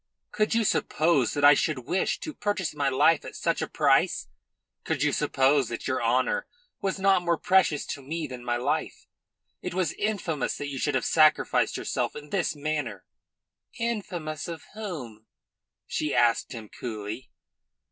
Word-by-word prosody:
"Could 215 +1 +1
you 230 - +3
suppose 155 - +2
that 145 0 +3
I 145 - +10
should 140 -3 -1
wish 180 +7 0
to 310 - -5
purchase 205 - -2
my 145 -2 0
life 130 - +4
at - - -9
such - - 0
a - - -1
price? - - +2 0.5
Could - - -1
you - - +3
suppose 135 +1 +2
that - - -5
your - - 0
honour - - +1 0.3
was 195 0 -1
not 195 -1 +4
more 170 -1 +1
precious 185 -4 +3
to 140 - -8
me 155 +4 -4
than 125 -3 -8
my 120 0 0
life? 120 - -2 0.6
It - - -5
was 185 -2 0
infamous 185 -9 -2
that 145 - -4
you 135 -2 -5
should 145 +1 0
have 130 - 0
sacrificed 155 -1 +3
yourself - - -2
in 150 0 -9
this 175 -4 0
manner." 145 -9 -3 0.7
"Infamous 185 -10 -3
of 165 -3 -6
whom?" 145 - -7 0.6
she 150 -2 -2
asked 120 -1 +3
him 115 -3 -7
coolly. 110 +1 -6
150 Hz, 165 wpm, -27 LUFS, 130-185 Hz, 0.7 s, I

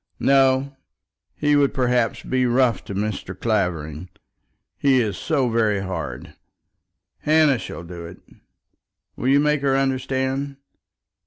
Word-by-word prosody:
"No; 135 0 +3 0.6
he 150 0 +2
would, 140 -1 +2
perhaps, 125 -3 +1
be 130 -1 0
rough 120 -3 +2
to 100 - -6
Mr. 100 -3 -4
Clavering. 90 -7 -2 0.7
He 135 -2 +3
is 110 -4 -1
so 140 -6 0
very 110 -4 +1
hard. 80 -10 -5 0.9
Hannah 155 -4 +3
shall 85 - -7
do 85 -1 -8
it. 85 - -11 1.0
Will 125 - -3
you 140 +2 +5
make 150 -1 +2
her 135 -1 +2
understand?" 135 +1 -1
125 Hz, 120 wpm, -22 LUFS, 100-135 Hz, 1.0 s, you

